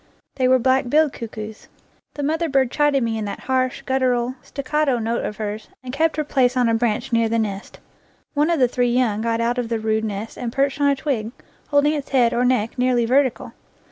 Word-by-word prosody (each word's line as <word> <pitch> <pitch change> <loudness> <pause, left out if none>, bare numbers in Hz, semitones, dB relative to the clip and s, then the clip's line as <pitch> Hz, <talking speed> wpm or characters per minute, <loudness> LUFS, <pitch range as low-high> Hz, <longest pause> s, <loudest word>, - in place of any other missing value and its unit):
They 255 -1 +2
were 260 0 +5
black 260 0 +1
billed 305 +1 +3
cuckoos. 220 -1 -8 0.5
The 290 - -4
mother 320 +3 0
bird 265 -3 +2
chided 295 -3 +2
me 225 -1 -1
in 215 - -3
that 200 - -6
harsh, 255 -1 -1
guttural, 255 -2 0
staccato 280 -1 -1
note 230 +1 -2
of 210 - -4
hers, 215 0 -5 0.2
and 255 0 -7
kept 320 +3 +1
her 305 - +1
place 260 -3 +1
on 245 -1 +3
a 230 - +2
branch 225 0 -1
near 230 -1 +3
the 230 - +1
nest. 205 -3 -4 0.5
One 300 +1 +2
of 335 -3 +1
the 250 - +5
three 245 0 0
young 235 -4 +1
got 230 0 0
out 240 +1 0
of 235 -2 -3
the 230 - 0
rude 220 0 0
nest 210 +1 -5
and 240 -2 -3
perched 275 +2 0
on 285 - +4
a 280 - +2
twig, 260 -6 -2 0.4
holding 290 +1 +3
its 290 -3 -4
head 245 -3 +3
or 245 - +1
neck 245 -2 0
nearly 250 -2 +2
vertical. 260 +1 +1
250 Hz, 220 wpm, -21 LUFS, 230-275 Hz, 0.5 s, were